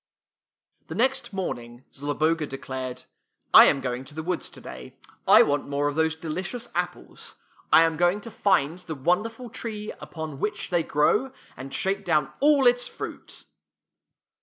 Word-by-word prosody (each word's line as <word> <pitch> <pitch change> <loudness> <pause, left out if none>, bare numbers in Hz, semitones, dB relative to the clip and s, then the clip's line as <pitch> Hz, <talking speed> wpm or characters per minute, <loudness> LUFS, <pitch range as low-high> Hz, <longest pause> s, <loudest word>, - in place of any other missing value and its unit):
The 160 - -6
next 265 +5 0
morning 120 - -5
Zloboga 150 +3 0
declared. 130 -2 -6 0.5
I - - +11
am 135 - +3
going 125 0 -3
to 145 - -12
the 160 - -4
woods 180 0 -3
today. 65 -1 -11 0.3
I - - +8
want 145 -1 -1
more 145 +1 0
of 145 - -1
those 160 +1 +1
delicious 185 +9 -5
apples. - - -5 0.4
I 165 - +8
am 165 -1 +1
going 175 +4 +2
to 230 - -9
find 170 -5 +1
the 170 -3 -7
wonderful 220 - -1
tree 215 -2 -5
upon 160 -4 -7
which 205 0 -3
they 175 -1 +3
grow, 160 - +1 0.2
and 135 +2 -9
shake 195 +1 -1
down 155 -5 +1
all 285 -1 +4
its 245 0 +4
fruit." - - -8
160 Hz, 155 wpm, -25 LUFS, 140-205 Hz, 0.5 s, I